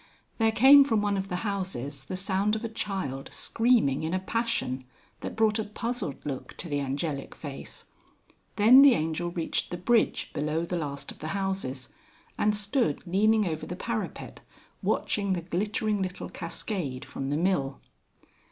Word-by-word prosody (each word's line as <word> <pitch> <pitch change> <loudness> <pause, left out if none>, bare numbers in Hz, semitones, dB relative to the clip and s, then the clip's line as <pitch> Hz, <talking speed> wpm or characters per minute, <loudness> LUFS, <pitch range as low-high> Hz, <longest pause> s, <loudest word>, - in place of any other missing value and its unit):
There 225 0 +4
came 270 +6 +8
from 225 -6 +1
one 205 -1 +1
of 195 0 -3
the 180 - -2
houses 145 - -3
the 185 - -4
sound 195 +2 +1
of 220 - -4
a - - -3
child 190 -11 -3
screaming 225 - +2
in 160 +3 -1
a - - +1
passion, 190 - -1 0.4
that - - -6
brought 220 -1 +2
a - - 0
puzzled 215 - -4
look 140 -3 -5
to 175 - -5
the 145 -2 -1
angelic 140 +1 -3
face. 140 -3 -8 0.7
Then 235 +6 +8
the 280 -3 +8
Angel 160 +1 -1
reached 170 -2 -2
the 175 - -4
bridge 225 +6 +1
below 155 +3 -1
the 180 - -3
last 140 -4 -4
of - - -14
the 155 - -5
houses, 190 -10 -3 0.5
and 210 0 +2
stood 205 - 0
leaning 210 +4 +3
over 160 -3 -3
the 180 - -4
parapet 220 +3 -4 0.4
watching 200 -2 0
the 175 - -2
glittering 205 +4 -1
little 185 -1 -4
cascade 165 - -3
from 135 0 -5
the 145 - 0
mill. 155 -6 0
185 Hz, 165 wpm, -28 LUFS, 150-215 Hz, 0.7 s, came